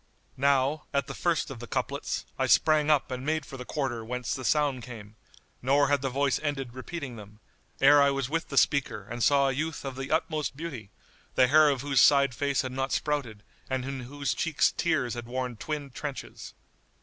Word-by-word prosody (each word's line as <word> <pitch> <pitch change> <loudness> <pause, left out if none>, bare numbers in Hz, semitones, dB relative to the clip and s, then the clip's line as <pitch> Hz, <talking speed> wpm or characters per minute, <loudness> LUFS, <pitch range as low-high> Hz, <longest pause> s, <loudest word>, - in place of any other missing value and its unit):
'" - - -39
Now, 140 +2 +1
at 140 - +2
the - - -7
first 170 -4 0
of 130 - -8
the 120 - -8
couplets, - - -3
I - - +2
sprang 155 -1 +4
up 145 -3 +2
and 130 0 -4
made 155 0 -1
for - - -9
the 125 -1 -7
quarter 130 -6 -3
whence 125 +1 -3
the 130 - -5
sound 145 -1 +1
came, 110 -4 -10 0.5
nor 140 +2 +3
had 145 -1 +2
the 135 - -1
voice 135 +1 +1
ended 135 -5 -3
repeating 130 -1 -6
them, 105 0 -13 0.4
ere 145 +1 +7
I 140 - +5
was 135 -2 -1
with 165 +4 -2
the 140 - -5
speaker 140 -8 +2
and 120 +1 -3
saw 140 -1 +4
a - - -1
youth 155 +2 -3
of 135 -1 -4
the 135 0 -5
utmost 155 -3 -1
beauty, 135 -11 -6 0.5
the 125 -1 +5
hair 155 +1 +6
of 135 -3 0
whose 140 -3 +3
side 140 -3 +5
face 140 +2 0
had 130 - -4
not 135 +1 -2
sprouted 130 -9 -2 0.3
and 130 -1 -2
in 135 0 -4
whose 140 +3 -3
cheeks 160 -3 +1
tears 140 -8 0
had 120 -1 -6
worn 125 0 -3
twin 145 +3 -5
trenches. 140 +2 -7
135 Hz, 210 wpm, -28 LUFS, 125-145 Hz, 0.5 s, ere